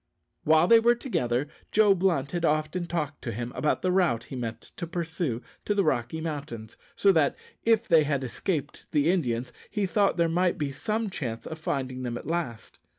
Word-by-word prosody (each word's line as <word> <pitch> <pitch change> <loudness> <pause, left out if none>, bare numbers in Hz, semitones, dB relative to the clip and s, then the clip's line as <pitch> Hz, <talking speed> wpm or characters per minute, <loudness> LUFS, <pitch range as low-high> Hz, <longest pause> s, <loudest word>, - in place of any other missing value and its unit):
While 160 +2 +5
they 230 +2 +8
were 235 +1 +4
together 130 - -1 0.2
Joe 210 -2 +5
Blunt 170 -7 +1
had 175 -1 -2
often 155 +3 0
talked 155 -4 -3
to 120 - -4
him 120 +2 -4
about 150 - 0
the 185 - +2
route 175 -12 +2
he 135 - -8
meant 115 -2 -5
to 170 - -4
pursue 160 -7 -3 0.2
to 205 - +1
the 200 - +3
Rocky 135 -1 0
Mountains, 145 -9 -5 0.2
so 200 - +5
that, 160 -6 +3 0.3
if 230 0 +3
they 165 -4 +6
had 140 -2 0
escaped 145 +3 -3
the 150 +2 +3
Indians, 125 -8 -1 0.2
he 205 -2 -1
thought 195 +2 +2
there 170 -1 +3
might 175 +2 +1
be 145 -2 -2
some 215 +9 -2
chance 115 -9 -4
of 160 - -6
finding 130 -4 -3
them 120 -1 -3
at - - -9
last. 155 -8 -4
155 Hz, 195 wpm, -27 LUFS, 130-180 Hz, 0.3 s, they